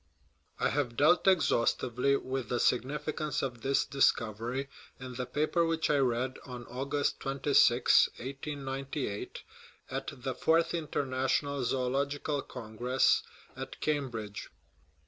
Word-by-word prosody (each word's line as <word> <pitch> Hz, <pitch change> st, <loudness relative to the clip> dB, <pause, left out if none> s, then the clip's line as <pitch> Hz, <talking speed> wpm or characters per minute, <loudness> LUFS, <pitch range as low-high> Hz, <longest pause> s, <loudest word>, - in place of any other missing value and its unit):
I -, -, +2 dB
have 125 Hz, -5 st, -1 dB
dealt 155 Hz, +6 st, +4 dB
exhaustively 140 Hz, -6 st, +3 dB
with 130 Hz, -3 st, -3 dB
the 120 Hz, -, 0 dB
significance 150 Hz, +4 st, 0 dB
of 120 Hz, -4 st, -4 dB
this 135 Hz, +2 st, +2 dB
dis 140 Hz, -1 st, +4 dB
covery 115 Hz, +5 st, -4 dB, 0.3 s
in 130 Hz, -1 st, -7 dB
the 125 Hz, 0 st, -4 dB
paper 155 Hz, +3 st, +1 dB
which 165 Hz, -2 st, +1 dB
I 145 Hz, -, +3 dB
read 130 Hz, 0 st, 0 dB
on 125 Hz, -2 st, -8 dB
August 135 Hz, +4 st, -2 dB
26, 135 Hz, -3 st, +4 dB
1898, 135 Hz, -3 st, -5 dB, 0.5 s
at -, -, -3 dB
the 130 Hz, +1 st, -4 dB
Fourth 165 Hz, +5 st, +2 dB
International 140 Hz, -3 st, -1 dB
Zoological 140 Hz, +3 st, -1 dB
Congress 125 Hz, +2 st, +1 dB, 0.3 s
at -, -, -7 dB
Cambridge. 120 Hz, -9 st, -3 dB
135 Hz, 115 wpm, -31 LUFS, 125-145 Hz, 0.5 s, dealt